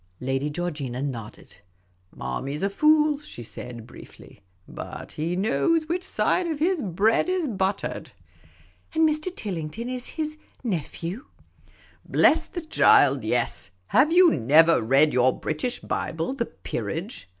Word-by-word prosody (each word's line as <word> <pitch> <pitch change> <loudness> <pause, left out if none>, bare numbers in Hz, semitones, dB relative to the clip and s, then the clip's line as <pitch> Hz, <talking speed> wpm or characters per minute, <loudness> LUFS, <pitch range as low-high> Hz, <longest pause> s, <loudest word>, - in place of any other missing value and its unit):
I<ady 135 +3 -1
Georgina 145 -7 -4
nodded. 120 -7 -7 0.3
" 90 0 -40
Marmy 135 - -4
's 150 - -4
a 195 - +1
fool," 305 +4 +3
she 295 - -10
.said, 115 0 -9
briefly; - - -14 0.2
" - - -38
but - - -8
he 165 +3 -2
knows 310 - +1
which 350 +2 -1
side 365 -1 0
of 320 -3 -2
his 335 +2 +1
bread 210 - +1
is 365 -4 0
buttered." 195 -4 -2 0.4
" - - -31
And 320 0 +5
Mr. 310 +2 -1
Tillington 195 +4 -5
is 255 -1 -3
— - - -18
his 310 -1 -2 0.2
nephew? 185 - -4 0.3
" - - -31
" - - -30 0.2
Bless 320 +1 +5
the 345 - -6
child, 145 - +4
yes; 115 -3 -1 0.2
have 305 +4 +4
you 355 0 +7
never 155 +7 +5
read 135 +7 +3
your 125 +1 +2
British 155 +11 -3
Bible, 165 +10 -3
the 240 -4 -2
peerage 175 - -6
190 Hz, 155 wpm, -25 LUFS, -, 0.4 s, you